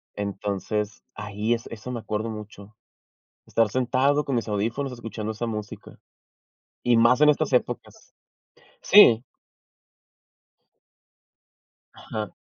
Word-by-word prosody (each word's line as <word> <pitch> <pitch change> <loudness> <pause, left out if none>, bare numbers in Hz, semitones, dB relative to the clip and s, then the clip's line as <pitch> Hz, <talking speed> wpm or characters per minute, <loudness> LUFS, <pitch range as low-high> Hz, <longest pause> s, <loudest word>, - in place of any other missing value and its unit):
Entonces 105 +1 -3
ahí 105 +2 -2
es 115 - -4
eso 115 +2 -8
me 120 - -4
acuerdo 110 +1 -3
mucho. 105 -1 -10 0.7
Estar 115 -2 +1
sentado 130 +5 +1
con 135 - -1
mis 115 - -1
audífonos 115 +6 -2
escuchando 110 -2 -5
esa 110 +2 -4
música. 105 -2 -7 0.9
Y 120 -1 +3
más 120 +4 +4
en 150 - +6
estas 150 -1 0
épocas. 125 - -2 0.7
Sí. 125 - +7 2.7
Ajá. 105 -2 -6
110 Hz, 105 wpm, -25 LUFS, 105-125 Hz, 2.7 s, Sí